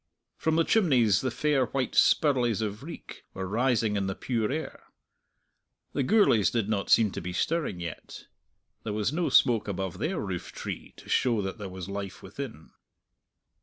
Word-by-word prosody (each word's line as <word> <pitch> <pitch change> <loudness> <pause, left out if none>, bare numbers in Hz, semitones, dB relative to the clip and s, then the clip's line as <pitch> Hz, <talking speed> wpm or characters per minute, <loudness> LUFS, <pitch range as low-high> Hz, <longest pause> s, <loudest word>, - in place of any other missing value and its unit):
From 160 0 0
the 165 - +4
chimneys 125 - +3
the 130 - 0
fair 135 +1 +1
white 130 0 -2
spirlies 125 -8 +3
of 105 0 -4
reek 160 +3 -10
were 95 0 -4
rising 115 0 +1
in 100 -1 0
the 95 - -3
pure 115 -2 -1
air. 160 +3 -5 1.1
The 140 - 0
Gourlays 130 - +4
did 115 -4 -1
not 105 -2 -1
seem 110 -3 +5
to - - -5
be 90 +1 -5
stirring 155 - -1
yet; 85 -2 -8 0.6
there 105 - -3
was 105 +5 -1
no 170 +1 0
smoke 120 -6 +4
above 95 -2 -4
their 170 +2 -1
roof 95 -4 -4
tree - - -7
to - - -14
show 115 -5 +2
that 95 +3 -5
there 100 -2 -5
was 95 -1 -7
life 100 -1 -6
within. 105 - -8
115 Hz, 170 wpm, -28 LUFS, 100-135 Hz, 1.1 s, seem